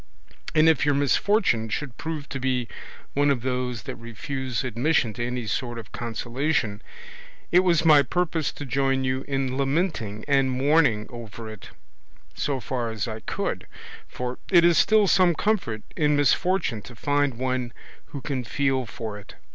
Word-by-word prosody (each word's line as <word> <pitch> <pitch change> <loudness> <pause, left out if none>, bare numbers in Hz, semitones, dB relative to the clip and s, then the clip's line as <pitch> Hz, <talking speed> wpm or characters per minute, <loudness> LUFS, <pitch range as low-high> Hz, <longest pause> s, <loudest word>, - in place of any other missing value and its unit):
And 155 +1 +6
if 160 -5 +4
your 145 -1 +2
misfortune 140 - +2
should 125 +2 -4
prove 160 -3 -5
to 135 - -4
be 125 -2 0 0.5
one 145 +1 +3
of 130 -4 +1
those 125 -3 -2
that - - -6
refuse 125 +2 -4
admission 125 0 +1
to 120 - -4
any 125 0 -3
sort 120 +2 -2
of 115 -3 -9
consolation, 120 -1 -2 0.7
it 175 - +7
was 170 -3 +3
my 150 -3 +8
purpose 160 +1 -1
to 145 - -7
join 135 0 +1
you 130 0 -1
in 135 -2 -1
lamenting 135 - -1
and 135 -2 +3
mourning 130 -4 +3
over 115 -2 -8
it, 110 - -11 0.6
so 140 -2 -2
far 120 +1 -3
as 110 +1 -3
I 110 -1 -5
could; - - -3 0.4
for 125 0 -5
it 170 -2 +6
is 175 -1 +5
still 215 +1 +5
some 180 -2 +4
comfort 150 - -1
in 150 -1 +2
misfortune 145 - +2
to 120 - -12
find 145 +1 +1
one 130 0 -2 0.3
who 140 - -8
can 130 -3 -3
feel 130 +1 0
for 110 -3 -6
it. 100 - -14
130 Hz, 165 wpm, -25 LUFS, 120-150 Hz, 0.7 s, my